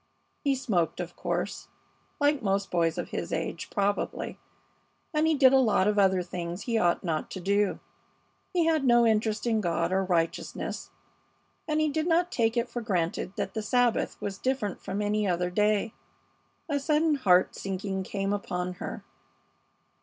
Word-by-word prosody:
He 280 Hz, -2 st, +2 dB
smoked, 190 Hz, -12 st, 0 dB
of 175 Hz, -1 st, -5 dB
course, -, -, -3 dB, 0.5 s
like 290 Hz, -1 st, +2 dB
most 195 Hz, -2 st, 0 dB
boys 165 Hz, -1 st, +1 dB
of 175 Hz, -, -3 dB
his -, -, -4 dB
age, -, -, -3 dB
probably, 200 Hz, -1 st, -1 dB, 0.7 s
and 305 Hz, +1 st, +2 dB
he 320 Hz, -, +3 dB
did 270 Hz, -2 st, +6 dB
a 270 Hz, -, +6 dB
lot 215 Hz, -6 st, +3 dB
of 210 Hz, 0 st, +2 dB
other 190 Hz, -2 st, +3 dB
things 175 Hz, +1 st, -5 dB
he 235 Hz, -, -2 dB
ought 175 Hz, -3 st, +2 dB
not 160 Hz, -4 st, -2 dB
to -, -, -6 dB
do. 200 Hz, +2 st, +1 dB, 0.7 s
He 350 Hz, -3 st, +2 dB
had 320 Hz, -3 st, +2 dB
no 240 Hz, -2 st, +5 dB
interest 220 Hz, 0 st, +1 dB
in 225 Hz, -2 st, +2 dB
God 170 Hz, -1 st, 0 dB
or 190 Hz, +1 st, +2 dB
righteousness, 170 Hz, -3 st, -2 dB, 0.8 s
and 305 Hz, -1 st, +1 dB
he 310 Hz, -, +3 dB
did 310 Hz, +2 st, -1 dB
not 350 Hz, +1 st, +2 dB
take 230 Hz, 0 st, +1 dB
it 235 Hz, +1 st, +1 dB
for 240 Hz, 0 st, -5 dB
granted 185 Hz, -2 st, -1 dB
that -, -, -3 dB
the 220 Hz, -, -2 dB
Sabbath 245 Hz, +2 st, +1 dB
was 200 Hz, -1 st, -5 dB
different 255 Hz, -7 st, -1 dB
from 205 Hz, +2 st, -3 dB
any 210 Hz, 0 st, +1 dB
other 180 Hz, 0 st, 0 dB
day. 210 Hz, +3 st, +1 dB, 0.7 s
A 290 Hz, -3 st, 0 dB
sudden 305 Hz, +2 st, +2 dB
heart 185 Hz, -10 st, +4 dB
sinking 190 Hz, 0 st, -3 dB
came 195 Hz, +1 st, -2 dB
upon 180 Hz, -3 st, -3 dB
her. -, -, -5 dB
210 Hz, 170 wpm, -28 LUFS, 185-255 Hz, 0.8 s, did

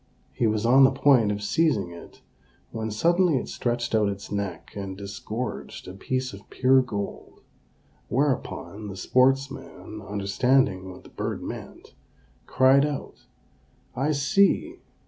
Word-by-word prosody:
He 115 Hz, -, +1 dB
was 110 Hz, 0 st, 0 dB
on 130 Hz, +3 st, +6 dB
the 130 Hz, -, +7 dB
point 130 Hz, -5 st, +4 dB
of 105 Hz, 0 st, -4 dB
seizing 105 Hz, -, +1 dB
it 85 Hz, -, -13 dB, 0.5 s
when 110 Hz, 0 st, -4 dB
suddenly 170 Hz, -, +2 dB
it -, -, -3 dB
stretched 120 Hz, -1 st, -2 dB
out 105 Hz, -2 st, +3 dB
its 100 Hz, 0 st, -7 dB
neck 100 Hz, -5 st, -4 dB
and 95 Hz, -2 st, -5 dB
disgorged 105 Hz, +4 st, -6 dB
a 90 Hz, -, -7 dB
piece 130 Hz, +6 st, -3 dB
of 100 Hz, 0 st, -13 dB
pure 130 Hz, 0 st, +4 dB
gold; 105 Hz, -5 st, -6 dB, 0.7 s
whereupon, 125 Hz, -6 st, -2 dB
the 100 Hz, -, -7 dB
sportsman, 130 Hz, -2 st, 0 dB
understanding 100 Hz, +1 st, +1 dB
what 90 Hz, -, -11 dB
the -, -, -14 dB
bird -, -, -4 dB
meant, -, -, -9 dB, 0.5 s
cried 130 Hz, +2 st, +5 dB
out, 145 Hz, -2 st, -5 dB, 0.7 s
"I 140 Hz, +5 st, 0 dB
see! 200 Hz, -, +2 dB
120 Hz, 135 wpm, -25 LUFS, 100-135 Hz, 0.7 s, the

